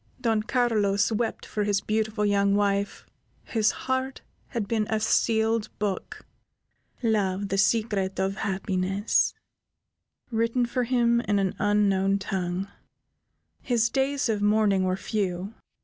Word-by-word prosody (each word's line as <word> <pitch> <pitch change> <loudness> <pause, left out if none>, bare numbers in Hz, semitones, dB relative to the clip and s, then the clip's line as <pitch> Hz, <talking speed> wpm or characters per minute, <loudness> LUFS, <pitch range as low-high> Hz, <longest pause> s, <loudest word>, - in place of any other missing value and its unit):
Don 225 -4 +1
Carlos 215 -4 +1
wept 225 +1 -2
for 210 - -2
his 205 -1 +1
beautiful 215 0 -1
young 200 -1 +2
wife, 200 0 0 0.5
whose 215 -2 +3 0.2
heart 260 +1 -1 0.3
had 230 -5 -3
been 215 -1 0
a 220 - +1
sealed 220 0 +1
book, 205 -2 -4 0.8
"Love, 200 -3 0
the 195 - -1
Secret 195 -2 +1
of 195 +1 -1
Happiness," 190 0 0 1.0
written 230 +2 +1
for 245 +1 -1
him 235 -1 +2
in 205 - +2
an 195 -2 0
unknown 200 -2 +2
tongue. 190 -1 -3 0.9
His 235 -2 +1
days 270 0 0
of 215 -3 -1
mourning 205 -2 +3
were 185 0 0
few. 195 -1 -3
210 Hz, 125 wpm, -26 LUFS, 195-230 Hz, 1.0 s, whose